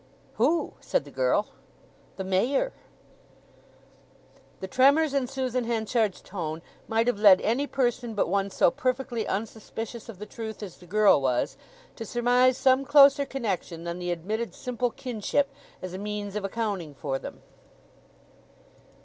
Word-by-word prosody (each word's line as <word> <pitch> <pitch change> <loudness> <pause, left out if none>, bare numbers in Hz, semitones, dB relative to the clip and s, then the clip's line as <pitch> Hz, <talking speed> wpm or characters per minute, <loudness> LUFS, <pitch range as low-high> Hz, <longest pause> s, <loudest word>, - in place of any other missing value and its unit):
"Who?" 295 +9 +2
said - - 0
the - - -12
girl. - - +1 0.7
"The 190 - -4
Mayor." 235 - +1 1.9
The 190 - -5
tremors 280 +7 +4
in 275 -3 +1
Susan 255 -2 -2
Henchard's 220 -2 0
tone 165 -4 -5 0.2
might 225 +1 +1
have 245 -4 0
led 200 -3 +8
any 255 +7 0
person 240 -4 -1
but 205 - +1
one 195 +2 0
so 185 - +3
perfectly 255 -2 -2
unsuspicious 225 +2 -5
of 220 - -8
the 210 - -7
truth 220 0 -7
as 185 -4 -8
the 180 - -16
girl 210 -4 +5
was, 125 -2 0 0.4
to 230 - -5
surmise 245 +3 +3
some 265 0 +4
closer 280 0 +6
connection 195 -9 -3
than 170 +1 -4
the 180 0 -3
admitted 210 +7 -3
simple 250 0 -2
kinship 255 +4 -2 0.3
as 185 -1 -5
a 185 - -5
means 205 0 -4
of 210 - -2
accounting 195 -7 -3
for 135 -1 -3
them. - - -9
225 Hz, 145 wpm, -27 LUFS, 195-255 Hz, 1.9 s, led